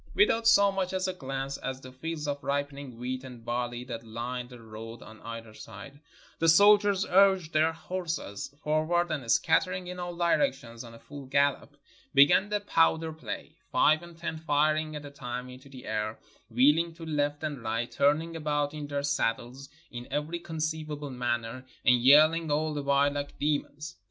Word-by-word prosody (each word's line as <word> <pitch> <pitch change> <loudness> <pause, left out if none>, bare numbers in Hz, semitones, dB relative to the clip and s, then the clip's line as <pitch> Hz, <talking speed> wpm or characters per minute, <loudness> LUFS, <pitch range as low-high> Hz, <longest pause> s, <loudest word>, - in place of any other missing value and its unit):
Without 230 - +3
so 200 -3 +6
much 190 -1 -2
as 185 0 0
a 185 - -2
glance 135 -4 -5
at 130 0 -5
the 130 - -10
fields 155 +3 -5
of 145 -1 -3
ripening 140 -3 -3
wheat 130 +2 -4
and 125 -3 -11
barley 120 0 -2
that 115 -2 -7
lined 120 +2 -5
the 125 -2 -12
road 115 +1 -10
on 110 0 -14
either 115 -1 -8
side, 115 +6 -11 0.4
the 165 - +4
soldiers 205 +2 +5
urged 190 -3 +4
their 155 +1 +3
horses 165 - -5 0.2
forward, 160 +3 +1
and 135 -7 -2
scattering 185 +3 +2
in 180 0 -7
all 175 -1 -5
directions 170 - 0
on 115 -1 -11
a - - -14
full 140 0 -10
gallop, 140 +1 +1 0.4
began 145 +8 +6
the 210 0 0
powder 165 -4 +2
play, 160 - -7
five 155 +1 +4
and 170 -1 -13
ten 165 -1 -4
firing 155 0 +1
at 150 -1 -7
a 145 - -9
time 125 -2 -6
into 130 +2 -13
the 130 -2 -11
air, 110 0 -2 0.3
wheeling 150 +8 +3
to 165 -1 -9
left 145 -1 -1
and 145 -5 -3
right, 115 +1 -2
turning 155 +4 +1
about 150 -2 -1
in 150 -1 -6
their 140 -1 -3
saddles 135 -1 -2 0.2
in 120 0 -7
every 155 +4 -2
conceivable 155 -3 -4
manner, 120 0 -3 0.2
and 125 -1 +5
yelhng 155 +4 +6
all 155 +1 0
the 145 - -3
while 140 0 +3
like 145 0 -5
demons. 150 +2 -2
145 Hz, 175 wpm, -28 LUFS, 125-165 Hz, 0.4 s, so